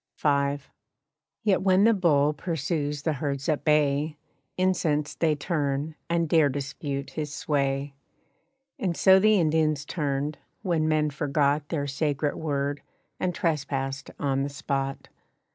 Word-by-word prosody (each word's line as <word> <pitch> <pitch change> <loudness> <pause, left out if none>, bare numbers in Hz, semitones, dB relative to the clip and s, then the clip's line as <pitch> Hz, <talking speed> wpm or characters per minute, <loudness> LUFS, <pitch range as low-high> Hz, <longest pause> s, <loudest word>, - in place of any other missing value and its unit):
V. 140 -1 +2 0.9
Yet 205 -3 +3
when 190 0 +4
the 230 +1 +6
bull 150 -7 +3
pursues 150 -2 -2
the 160 - +1
herds 140 0 -3
at 155 -3 0
bay, 150 0 +2 0.4
Incensed 165 -5 0
they 160 -2 +3
turn, 145 -1 -1 0.2
and 170 -1 +1
dare 155 -2 +4
dispute 140 0 -4
his 150 -2 -4
sway. 140 -2 -1 0.9
And 180 -4 -1
so 190 0 +7
the 215 0 +4
Indians 155 -3 +1
turned, 145 -1 -2 0.2
when 165 -5 +1
men 155 -1 +2
forgot 145 0 0
Their 145 -4 -1
sacred 145 +1 -1
word, 145 -2 -2 0.4
and 180 -1 -1
trespassed 135 -5 -2
on 135 -1 0
the 140 - -1
spot. 140 -1 -3
150 Hz, 130 wpm, -26 LUFS, 140-160 Hz, 0.9 s, so